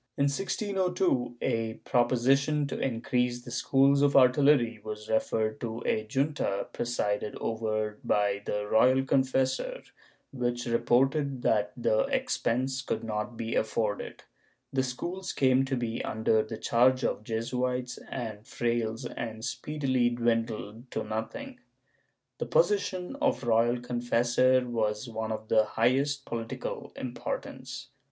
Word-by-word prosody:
In 140 - +2
1602 180 - 0
a 115 -1 0
proposition 135 +5 +2
to 140 - -4
increase 125 0 0
the 120 - -9
schools 135 +3 +3
of 145 -1 +4
artillery 125 -3 +5
was 105 0 -6
referred 110 0 0
to 115 -1 -4
a 110 0 0
junta 135 -6 0
presided 105 -3 -1
over 110 -1 -2
by 100 -1 +1
the 105 0 -2
royal 130 +5 +4
confessor, 130 0 +1 0.5
which 120 -2 -2
reported 130 +3 +1
that 105 -1 +2
the 110 -2 +2
expense 130 +3 0
could 125 - -3
not 110 +1 -3
be 115 0 -3
afforded; 110 -1 -1 0.5
the 135 - +2
schools 175 +9 -4
came 130 0 +3
to 135 -1 -1
be 115 -1 -2
under 110 0 +2
the 110 +1 -6
charge 130 +4 +3
of - - -1
Jesuits 125 +3 -2
and 110 -5 -4
frailes 115 -1 -1
and 110 -1 -5
speedily 130 -5 0
dwindled 115 -1 -2
to - - -3
nothing.^ 110 - -5 0.8
The - - -2
position 275 - +1
of 275 - +1
royal 120 +1 +3
confessor 125 +1 +2
was 110 -1 -1
one 110 -1 -4
of 110 0 -5
the 110 -1 +4
highest 135 +6 +1
political 450 - -5
importance. - - -5
120 Hz, 125 wpm, -29 LUFS, 110-135 Hz, 0.8 s, artillery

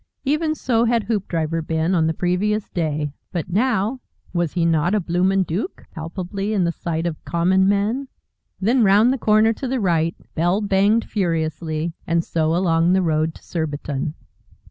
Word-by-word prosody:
Even 310 +3 +1
so 235 -5 +1
had 230 -1 +2
Hoopdriver 170 -7 -1
been 160 +2 0
on 165 -3 +3
the 160 - 0
previous 195 +5 0
day. 150 -4 -2 0.2
But 170 -2 -3
now, 225 +3 +1 0.3
was 170 -3 0
he 170 -2 +1
not 165 +4 +2
a - - +3
bloomin' 185 +2 +1
Dook, 185 - -4
palpably 185 +5 -4
in 195 -4 +2
the 170 - +1
sight 165 -1 -3
of 165 -3 -4
common 185 +3 +2
men? 215 +7 0 0.5
Then 230 +5 +3
round 210 +5 +5
the 265 - -3
corner 215 +1 +4
to 260 - -5
the 260 +1 -1
right 165 -4 +1 0.2
bell 175 +4 +1
banged 205 +2 +2
furiously 165 -3 -2
and 165 0 +1
so 160 0 0
along 170 -1 +2
the 190 0 +3
road 155 -1 0
to - - -15
Surbiton. 150 -2 -3
180 Hz, 165 wpm, -21 LUFS, 165-210 Hz, 0.5 s, round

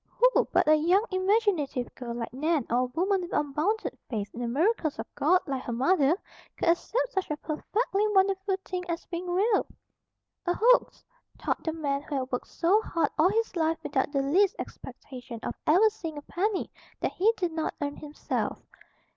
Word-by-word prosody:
Who - - +3
but - - +3
a 310 - +7
young 350 +7 +3
imaginative 375 - +1
girl, 235 -2 -6
like 230 -1 -5
Nan, 300 0 0
or 240 - +3
a 255 - +2
woman 365 +9 0
with 350 - -6
unbounded 305 +10 0
faith 205 -4 -3
in - - -8
the 240 - -1
miracles 315 - +1
of - - -4
God, 360 +6 +3
like 270 -2 -3
her 245 - -5
mother, 280 +5 +3 0.4
could - - +1
accept 485 +8 +1
such 385 - -1
a 300 - -2
perfectly 400 +7 -1
wonderful 390 -1 +2
thing 365 -1 -3
as 335 0 -3
being 355 +1 -5
real? 400 +4 +2 0.8
"A 350 - +2
hoax," - - +3 0.3
thought - - -2
the 320 - -1
man 285 -3 -2
who 295 0 -5
had 260 -1 -2
worked 250 - -2
so 370 +6 +2
hard 330 -8 0
all 335 +4 +6
his 450 0 -1
life 325 -1 +1
without 265 +1 0
the 275 -2 +1
least 375 +8 +3
expectation 250 -3 -8
of - - -3
ever 370 +8 +6
seeing 330 -8 -7
a 290 - -7
penny 390 +5 -1 0.3
that - - -1
he 420 +5 +3
did 355 -3 -1
not 320 -1 -2
earn 285 0 -3
himself. 300 0 -3
330 Hz, 190 wpm, -28 LUFS, 280-385 Hz, 0.8 s, a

